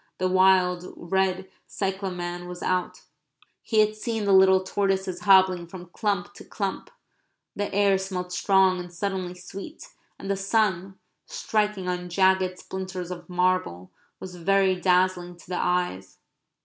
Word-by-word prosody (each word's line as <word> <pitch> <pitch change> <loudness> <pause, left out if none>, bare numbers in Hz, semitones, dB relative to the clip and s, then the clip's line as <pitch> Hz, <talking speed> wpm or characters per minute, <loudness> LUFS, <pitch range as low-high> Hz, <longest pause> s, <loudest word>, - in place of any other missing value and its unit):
The 185 - 0
wild 185 -1 +3
red 190 +1 -1 0.2
cyclamen 180 -3 -4
was 180 0 -8
out; 185 -1 -1 0.6
he 220 -2 +2
had 215 0 +1
seen 220 0 -3
the 200 - +3
little 190 0 +6
tortoises 190 -1 -1
hobbling 185 -3 +4
from 175 0 -11
clump 205 -3 -2
to - - -12
clump; 195 -2 -4 0.7
the 205 0 -3
air 200 -1 +3
smelt 185 -2 -5
strong 190 -1 +3
and 175 0 -8
suddenly 185 0 -3
sweet, 195 - -10 0.3
and - - -9
the 195 - 0
sun, 195 -2 0 0.3
striking 210 - -1
on 180 0 -3
jagged 190 0 +2
splinters 185 -2 -6
of 180 0 -8
marble, 180 - -1 0.3
was 180 -1 -9
very 195 +2 +2
dazzling 180 -1 +1
to - - -18
the 180 0 -3
eyes. 180 - -1
185 Hz, 140 wpm, -25 LUFS, 180-195 Hz, 0.7 s, little